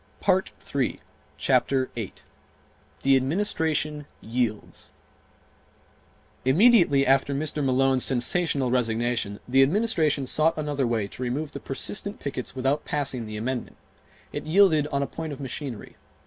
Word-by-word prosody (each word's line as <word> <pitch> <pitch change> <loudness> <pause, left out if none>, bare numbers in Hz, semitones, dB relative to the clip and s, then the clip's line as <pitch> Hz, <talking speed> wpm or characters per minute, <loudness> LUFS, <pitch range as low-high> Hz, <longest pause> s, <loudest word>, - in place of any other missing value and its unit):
Chapter 130 -1 +1
8 115 -5 -6 0.8
The 135 0 +5
Administration 150 -1 0
Yields 115 -2 -3 1.5
Immediately 165 - +5
after 135 +1 +2
Mr. 150 0 -1
Malone's 130 0 +2
sensational 135 +1 +2
resignation 115 -3 0
the 135 +2 +4
Administration 155 -3 +2
sought 155 +5 +2
another 145 -4 -1
way 110 -4 -1
to - - -11
remove 135 +5 -2
the 140 - -7
persistent 200 +10 -4
pickets 135 -3 -5
without 135 +3 0
passing 135 -6 -2
the 105 0 -6
amendment. 125 +3 -4 0.6
It - - -5
yielded 160 -4 +4
on 140 -2 -1
a - - -1
point 160 +1 -6
of 135 - -9
machinery. 135 -2 -6
135 Hz, 120 wpm, -25 LUFS, 125-155 Hz, 1.5 s, The